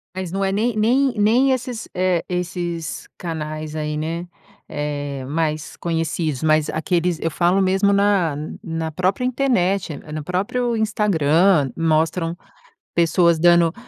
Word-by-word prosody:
Mas 185 -2 -4
não 195 +1 -1
é 195 - 0
nem 220 +3 0
nem 250 +5 +3
nem, 240 +6 +4 0.4
eh, 180 -2 +1
esses 175 -2 -4
canais 155 -2 -5
aí, 150 -1 -3
né. 165 +3 -3 0.4
É, 145 -2 -4
mais 155 +1 -2
conhecidos, 165 -4 -2
mas 155 -1 +2
aqueles 170 +1 0
eu 165 - -1
falo 175 +4 +2
mesmo 195 +2 +3
na 200 -6 +2 0.3
na 165 -3 -3
própria 185 +8 0
internet, 200 - +1
eh, 150 - -11
no 155 -1 -4
próprio 230 +7 -1
Instagram, 190 - +2
mostram 165 +1 +1 0.6
pessoas 170 0 +3
dand 170 0 +5
170 Hz, 130 wpm, -21 LUFS, 155-195 Hz, 0.6 s, dand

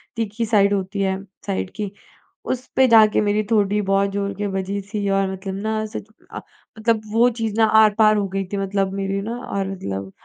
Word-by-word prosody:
तीखी 225 0 -2
साइड 205 -2 +3
होती 195 +1 -2
है। 190 -1 0 0.3
साइड 95 0 -2
की 205 -2 -4 0.5
उस 255 0 -3
पे 265 -1 +5
जाकर 220 -2 +6
मेरी 210 +1 +1
ठोड़ी 210 -1 +2
बहुत 195 0 +1
ज़ोर 200 0 -2
के 205 - -2
बजी 195 +1 -3
थी 205 -1 -1
और 195 -1 +1
मतलब 190 0 -5
ना 220 0 0
उस 215 +1 -8
अ, 220 - -10 0.4
मतलब 220 -1 +1
वो 235 +2 +5
चीज़ 220 -2 -2
ना 220 - +5 0.2
आर-पार 215 0 +4
हो 200 -1 0
गई 195 0 -3
थी - - 0
मतलब 195 0 -1
मेरी 195 0 -2
ना 230 +4 -4
और 195 -5 -3
मतलब 100 - -5
200 Hz, 200 wpm, -21 LUFS, 195-220 Hz, 0.5 s, जाकर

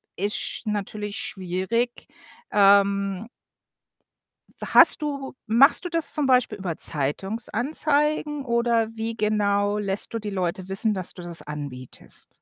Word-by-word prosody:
ist 205 +3 -1
sch - - -3
natürlich 210 0 -3
schwierig. 190 +6 -2 0.4
Ähm 200 0 +3 1.3
We - - -6
hast - - +7
du 280 -3 -4
machst 265 - +4
du 355 - -2
das 330 -3 -1
zum 300 -2 0
Beispiel 250 -5 +3
über 180 -4 -4
Zeitungsanzeigen 275 - -1
oder 235 -1 +1
wie 225 +1 -3
genau 205 -1 +1
lässt 200 +1 -3
du 230 - -1
die 210 -1 -5
Leute 185 -1 -2
wissen, 210 +3 +2
dass 185 -2 -3
du - - -10
das 175 -1 -3
anbietest? 140 -4 -8
210 Hz, 130 wpm, -24 LUFS, 190-235 Hz, 1.3 s, hast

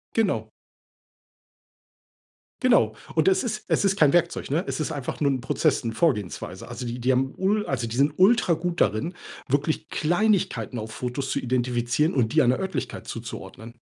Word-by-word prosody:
Genau. 220 -4 0 2.1
Genau. 175 - +4 0.2
Und 160 0 +2
es 190 0 +2
ist 215 -3 -3
es - - +2
ist 195 0 +3
kein 150 -6 +5
Werkzeug, 175 -4 +1
ne? 165 +7 +1
Es - - -2
ist 155 - -2
einfach 145 -2 -5
nur 140 -1 +3
'n 130 - -1
Prozess, 140 +4 +1
'ne 115 - -2
Vorgehensweise. 110 - -1
Also 125 - -6
die 120 +1 -4
die 125 +2 +2
haben 130 +1 0
ul 205 +2 +1
also 120 -4 -2
die 115 - -5
sind 140 +3 +3
ultragut 180 -4 +3
darin, 110 - +1 0.3
wirklich 145 +3 0
Kleinigkeiten 175 - 0
auf 110 0 -5
Fotos 125 +4 -4
zu - - 0
identifizieren 125 +4 0
und 120 -4 +1
die 155 - +5
einer 125 -1 +2
Örtlichkeit 190 0 -4
zuzuordnen. 115 +1 -8
140 Hz, 170 wpm, -25 LUFS, 120-175 Hz, 2.1 s, kein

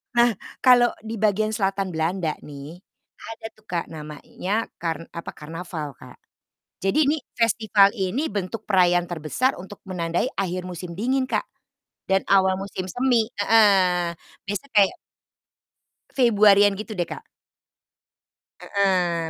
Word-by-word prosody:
Nah 240 0 +5 0.3
kalo 245 -2 +6
di 225 0 -5
bagian 215 0 +1
selatan 195 -3 -1
Belanda 165 0 -1
nih, 145 +4 -10 0.4
ada 225 0 -9
tuh 215 0 -28
Kak 170 -1 -3
namanya, 160 +7 -4 0.2
kar 165 -1 -2
apa, 170 - -7
karnaval, 160 -1 -6
Kak. - - -13 0.6
Jadi 275 +10 +2
ini, 310 - +2 0.2
festival 220 -4 +4
ini 210 +11 -1
bentuk 200 +1 -4
perayaan 175 -2 +3
terbesar 175 - -1
untuk 190 +2 -11
menandai 175 +5 -1
akhir 185 -2 -1
musim 180 -1 -7
dingin, 260 +6 0
Kak. - - 0 0.7
Dan 190 0 +3
awal 190 -1 +5
musim 190 -1 -5
semi, 245 +2 +2
heeh, 190 -5 +4 0.3
biasa 205 +7 -3
kayak 205 -4 +4 1.2
Februari-an 205 -5 +5
gitu 215 0 -6
deh, 175 -2 -1
Kak. 460 - -9 1.3
Heeh, 180 -4 0
195 Hz, 125 wpm, -23 LUFS, 175-220 Hz, 1.3 s, kalo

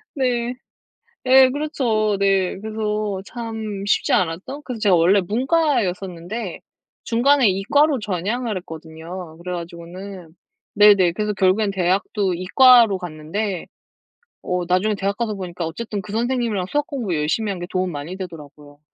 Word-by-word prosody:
네. 245 -3 0 0.7
예, 260 0 +7
그렇죠. 245 -8 0
네. 195 -2 +1
그래서 210 -2 -3
참 220 -4 -5
쉽지 - - +2
않았던. 185 - -1
그래서 250 -5 -6
제가 200 -4 +4
원래 175 +4 +4
문과였었는데 210 - -1 0.4
중간에 255 +1 +3
이과로 275 +9 +2
전향을 210 +4 -2
했거든요. 160 0 -9
그래 180 0 -4
가지고는 175 +1 -8 0.4
네네 200 -4 +6
그래서 210 +2 -2
결국엔 195 +2 +2
대학도 190 +1 0
이과로 230 +3 +6
갔는데 180 +3 -4 0.8
어 180 -1 -2
나중에 185 +4 +2
대학 200 0 -2
가서 220 -2 -2
보니까 180 -3 -5
어쨌든 205 +4 -5
그 200 - -10
선생님이랑 235 -4 0
수학 295 0 0
공부 230 - -3
열심히 160 +8 0
한 190 - -5
게 175 - -5
도움이 185 -1 -1
많이 150 +4 -6
되더라고요. 150 -5 -10
200 Hz, 325 characters per minute, -21 LUFS, 180-230 Hz, 0.8 s, 예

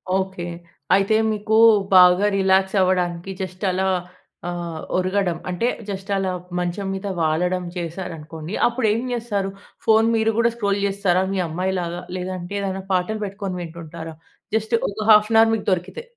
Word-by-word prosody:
Okay. 190 -2 -2 0.5
అయితే 195 +2 +2 0.2
మీకు, 215 +1 -1 0.4
బాగా 180 +2 +7
రిలాక్స్ 190 +1 +2
అవ్వడానికి, 180 -1 0
జస్ట్ 185 +1 -6
అలా 190 +1 0 0.6
ఆహ్, 170 -2 -4 0.2
ఒరుగడం 185 -2 0
అంటే, 180 +7 0 0.2
జస్ట్ 195 0 -6
అలా 190 -1 -1 0.3
మంచం 180 +3 -2
మీద 195 +1 -5
వాలడం 175 +3 +1
చేశారనుకోండి, 165 -1 -6
అప్పుడేం 230 -2 0
చేస్తారు? 210 -5 -2 0.4
ఫోన్ 225 0 +5
మీరు 225 0 +2
కూడా 235 0 +4
స్క్రోల్ 200 -3 0
చేస్తారా, 195 -2 +1
మీ 195 - -1
అమ్మాయిలాగా? 175 0 -2 0.2
లేదంటే, 185 +1 -5
ఏదైనా 190 -1 -3
పాటలు 190 +4 0
పెట్టుకొని 195 -2 -5
వింటుంటారా? 165 -1 -8 0.4
జస్ట్ 220 +1 +1
ఒక 205 - -9
హాఫ్ 210 +1 +6
ఏన్ 225 - +6
అవర్ 225 - +4
మీకు 215 - -5
దొరికితే. 185 - -2
190 Hz, 140 wpm, -22 LUFS, 175-205 Hz, 0.6 s, బాగా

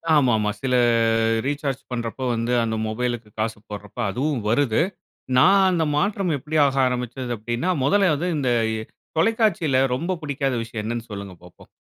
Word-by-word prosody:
ஆமா 130 -5 +4
ஆமா, 105 -1 0
சில 130 -1 +1 0.7
ரீசார்ஜ் 140 -1 -2
பண்றப்போ, 120 +1 -4
வந்து 115 +2 -1
அந்த 110 -1 -1
மொபைல்க்கு 120 0 -3
காசு 110 0 -1
போடுறப்போ 105 +2 -7
அதுவும் 135 +4 -1
வருது. 120 +2 +2 0.6
நான் 195 +7 +6
அந்த 165 -3 +1
மாற்றம் 195 +1 0
எப்டி 155 +4 -2
ஆக 135 0 -1
ஆரம்பிச்சது 125 0 -3
அப்டின்னா, 120 - -2
முதல்ல 195 +2 +3
வந்து 175 +5 -2
இந்த 135 -4 0 0.7
தொலைக்காட்சில 185 - +2
ரொம்ப 170 +8 -2
பிடிக்காத 140 -3 -1
விஷயம் 115 -1 -5
என்னன்னு 115 +1 -4
சொல்லுங்க 100 -2 -7
பாப்போம்? 90 - -17
130 Hz, 145 wpm, -23 LUFS, 115-150 Hz, 0.7 s, நான்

